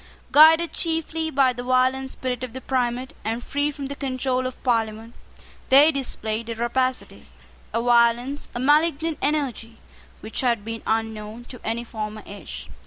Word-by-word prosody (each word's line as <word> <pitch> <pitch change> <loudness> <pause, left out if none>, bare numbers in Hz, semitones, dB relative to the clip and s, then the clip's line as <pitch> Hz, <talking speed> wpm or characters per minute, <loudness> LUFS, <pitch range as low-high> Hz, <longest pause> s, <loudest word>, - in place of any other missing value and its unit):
Guided 320 +3 +7
chiefly 325 -1 -1
by 265 -3 +3
the 245 - -6
violent 255 +1 +1
spirit 255 -1 -4
of 250 -3 -6
the 260 - -5
primate, 255 -1 -1
and 225 +3 -3
free 285 +1 0
from 285 -1 -6
the 280 +1 -5
control 255 -2 -1
of 255 - -9
Parliament, 225 -2 -1 0.6
they 285 +4 +7
displayed 230 -5 -3
a 230 - -3
rapacity, 255 +2 -2 0.4
a 230 - 0
violence, 240 +3 +2
a - - -2
malignant 310 +3 +2
energy, 265 -6 -1 0.4
which 220 - -3
had 235 -5 0
been 225 0 -5
unknown 220 +1 -2
to 250 - -10
any 230 +2 -2
former 215 -2 -6
age. 200 0 -9
255 Hz, 155 wpm, -24 LUFS, 230-275 Hz, 0.6 s, Guided